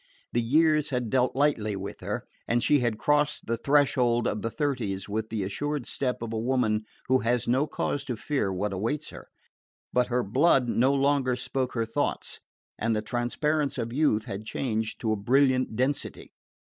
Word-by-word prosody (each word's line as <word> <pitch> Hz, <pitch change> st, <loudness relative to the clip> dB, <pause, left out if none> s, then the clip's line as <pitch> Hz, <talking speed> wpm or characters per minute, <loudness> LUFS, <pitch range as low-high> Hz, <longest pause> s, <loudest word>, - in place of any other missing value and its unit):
The 120 Hz, -, +2 dB
years 150 Hz, +4 st, +3 dB
had 125 Hz, -4 st, -2 dB
dealt 130 Hz, -1 st, +2 dB
lightly 125 Hz, -7 st, +1 dB
with 95 Hz, +1 st, -6 dB
her, -, -, -4 dB, 0.2 s
and 120 Hz, +1 st, +1 dB
she 145 Hz, +1 st, +4 dB
had 120 Hz, -3 st, 0 dB
crossed 150 Hz, +3 st, +1 dB
the 115 Hz, -, 0 dB
threshold 125 Hz, -3 st, +2 dB
of 105 Hz, -, -2 dB
the 115 Hz, -, -1 dB
thirties 115 Hz, -8 st, -2 dB
with 110 Hz, +2 st, -3 dB
the 110 Hz, -3 st, -2 dB
assured 145 Hz, +8 st, -3 dB
step 125 Hz, -3 st, -2 dB
of 115 Hz, -1 st, -4 dB
a 110 Hz, -, -1 dB
woman 115 Hz, -3 st, +1 dB, 0.2 s
who 130 Hz, 0 st, +4 dB
has 120 Hz, 0 st, 0 dB
no 130 Hz, +5 st, +2 dB
cause 145 Hz, -1 st, -2 dB
to 125 Hz, -, -3 dB
fear 135 Hz, -6 st, -1 dB
what 95 Hz, +2 st, -2 dB
awaits 115 Hz, +11 st, -2 dB
her. -, -, -11 dB, 0.7 s
But 125 Hz, -1 st, +3 dB
her 125 Hz, 0 st, 0 dB
blood 130 Hz, +4 st, +3 dB
no 125 Hz, +3 st, +3 dB
longer 140 Hz, -2 st, +2 dB
spoke 125 Hz, +1 st, -2 dB
her 115 Hz, -1 st, +1 dB
thoughts, 115 Hz, -, -2 dB, 0.4 s
and 115 Hz, 0 st, +1 dB
the 105 Hz, -, -1 dB
transparence 140 Hz, +6 st, -1 dB
of 115 Hz, -1 st, -3 dB
youth 125 Hz, -7 st, +2 dB
had 100 Hz, +2 st, -5 dB
changed 110 Hz, -1 st, -2 dB
to 110 Hz, -, 0 dB
a -, -, +2 dB
brilliant 130 Hz, +3 st, +2 dB
density. 130 Hz, +4 st, -2 dB
125 Hz, 185 wpm, -27 LUFS, 110-140 Hz, 0.7 s, she